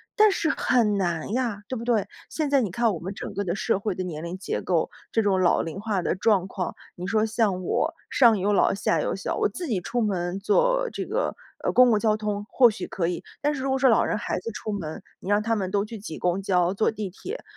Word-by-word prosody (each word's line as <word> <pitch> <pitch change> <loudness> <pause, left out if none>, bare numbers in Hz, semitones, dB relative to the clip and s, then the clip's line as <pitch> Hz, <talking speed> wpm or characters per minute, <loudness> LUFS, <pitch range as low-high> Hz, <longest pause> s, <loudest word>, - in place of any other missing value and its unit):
但 430 -1 +6
是 335 - 0
很 225 -8 +2
难 170 +1 -1
呀， 235 -5 -1
对 260 - -3
不 230 - -5
对？ 235 -4 +1 0.2
现 310 -2 -1
在 280 -1 +3
你 215 - -1
看 230 +4 +1
我 170 - -5
们 190 +3 -6
整 - - -6
个 200 - -2
的 180 -2 -2
社 200 0 0
会 200 -2 -2
的 185 - -3
年 160 -3 -5
龄 170 +2 -5
结 190 - -3
构。 170 -3 0 0.2
这 225 - +2
种 195 -2 +2
老 175 - +3
龄 165 +3 -6
化 205 -5 -1
的 - - +1
状 190 0 +2
况， 185 -2 -4 0.2
你 180 +1 -6
说 215 +2 +2
像 215 -4 0
我， 325 - 0 0.2
上 235 -5 +5
有 200 +2 +1
老 - - +4
下 165 -5 +1
有 - - -1
小， 195 - -3
我 - - +2
自 345 - -6
己 215 - -1
出 240 +6 -2
门 185 -3 -1
坐 - - +2
这 - - -3
个， - - -1 0.3
呃， - - +1
公 250 0 +6
共 215 -3 +3
交 215 -1 +2
通 210 -1 -3
或 245 -3 +6
许 215 - -5
可 170 -3 -2
以， 175 - -3 0.2
但 295 +1 +1
是 265 - -4
如 270 - 0
果 265 - +1
说 265 0 +5
老 225 - +4
人 - - 0
孩 210 - -2
子 230 +5 -5
出 215 0 -5
门， 165 -7 -5 0.2
你 195 - -4
让 205 - +4
他 225 +1 0
们 190 -3 -2
都 200 0 +1
去 220 +2 -7
挤 195 -6 -7
公 180 +2 0
交、 180 -1 +2
坐 215 - +2
地 215 -3 -4
铁， 390 - -7
205 Hz, 280 characters per minute, -25 LUFS, 185-230 Hz, 0.3 s, 但